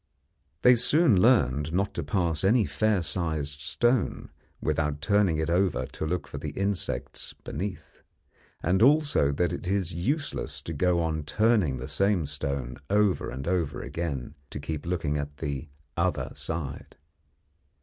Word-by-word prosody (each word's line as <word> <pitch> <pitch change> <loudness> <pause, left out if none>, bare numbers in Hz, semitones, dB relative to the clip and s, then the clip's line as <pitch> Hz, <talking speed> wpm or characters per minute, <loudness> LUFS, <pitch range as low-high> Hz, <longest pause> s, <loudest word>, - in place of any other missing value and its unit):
They 125 - +8
soon 125 - +4
learned 80 - +3
not 100 +2 0
to - - -2
pass 85 -6 0
any 110 +3 +4
fair 110 -4 +1
sized 80 -5 -2
stone 120 -2 0 0.3
without 75 -1 0
turning 100 0 +2
it 80 0 0
over 90 +2 +1
to 80 - -5
look 90 +2 -2
for - - -6
the - - -4
insects 100 -1 -2
beneath, 95 -1 -6 0.6
and 95 +4 +2
also 145 - +4
that 85 +3 +1
it 90 - -5
is 95 -3 0
useless 140 - -2
to 80 - -5
go 85 +3 +2
on 80 -1 -1
turning 105 - +2
the 65 +1 -6
same 90 +3 +1
stone 70 -3 -3
over 105 -2 +2
and 65 +4 -6
over 85 -5 0
again 70 -6 -4 0.2
to - - -6
keep 75 +1 -5
looking 75 -4 0
at 70 0 -5
the 70 +1 -4 0.3
'other 85 -2 0
side.' 80 -5 -5
85 Hz, 150 wpm, -27 LUFS, 75-100 Hz, 0.6 s, They